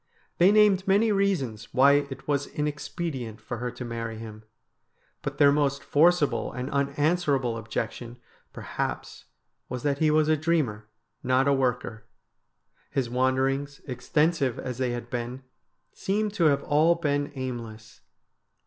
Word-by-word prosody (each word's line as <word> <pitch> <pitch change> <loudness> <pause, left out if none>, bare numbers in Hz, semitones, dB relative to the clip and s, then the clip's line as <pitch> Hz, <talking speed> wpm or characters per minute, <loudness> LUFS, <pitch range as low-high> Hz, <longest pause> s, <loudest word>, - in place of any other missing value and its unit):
They 180 +3 +6
named 205 -3 +4
many 210 +3 +4
reasons 150 - -1
why 140 +2 +5
it 135 0 -9
was 145 -1 0
inexpedient 145 - -4
for 120 +2 -6
her 125 +1 -3
to 125 +1 -7
marry 115 -1 -5
him, 110 -1 -9 0.8
but - - -5
their 140 -1 +6
most 140 -1 0
forcible 160 0 +2
and 125 +2 -5
unanswerable 140 -2 +1
objection 115 +2 -5 0.3
per - - -9
haps - - -4 0.4
was 125 -1 -5
that 140 -1 0
he 155 - +3
was 155 0 +3
a 155 - +4
dreamer, 145 -10 -1 0.3
not 130 +2 +2
a 140 - +4
worker. 125 -4 -1 0.8
His 125 -4 -2
wander 130 +1 +2
ings, 140 +1 -3
extensive 135 +1 0
as 125 -1 -5
they 130 -1 0
had 120 0 -5
been, 125 +1 -4 0.5
seemed 210 +1 -1
to 175 -5 +1
have 140 -2 +3
all 155 +3 +3
been 145 -3 -1
aimless. 115 -4 -7
140 Hz, 145 wpm, -26 LUFS, 120-155 Hz, 0.8 s, They